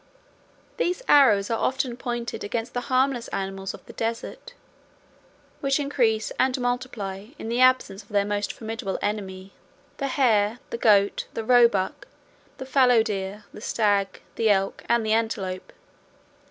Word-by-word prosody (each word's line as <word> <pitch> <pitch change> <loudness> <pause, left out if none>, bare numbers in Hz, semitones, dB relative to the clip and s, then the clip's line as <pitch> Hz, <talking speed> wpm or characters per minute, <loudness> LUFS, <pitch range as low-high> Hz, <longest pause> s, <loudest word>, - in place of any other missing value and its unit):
These 360 +8 -1
arrows 225 -8 +5
are 225 - 0
often 260 -2 -1
pointed 240 -1 -4
against 225 +3 -3
the 245 - -2
harmless 255 -2 +1
animals 195 0 -4
of - - -17
the - - -12
desert, 230 - -5 1.0
which 275 +1 +1
increase 240 -7 +1
and 260 0 +2
multiply 245 -6 -3
in 225 - -6
the 240 +2 0
absence 255 -6 +3
of 195 - -23
their 200 -1 +1
most 205 0 -1
formidable 225 -3 -5
enemy; 195 -2 -4 0.4
the 275 - -2
hare, 230 -5 +2
the - - -2
goat, 205 -3 +3
the 225 - -2
roebuck, 230 -5 +3 0.5
the 265 - -7
fallow 255 -4 +4
deer, 205 -1 -4
the - - -10
stag, 205 -4 0
the 225 -1 +2
elk, 195 -1 +1
and 235 -1 +2
the 215 - +2
antelope. 205 -5 -2
225 Hz, 145 wpm, -25 LUFS, 205-250 Hz, 1.0 s, arrows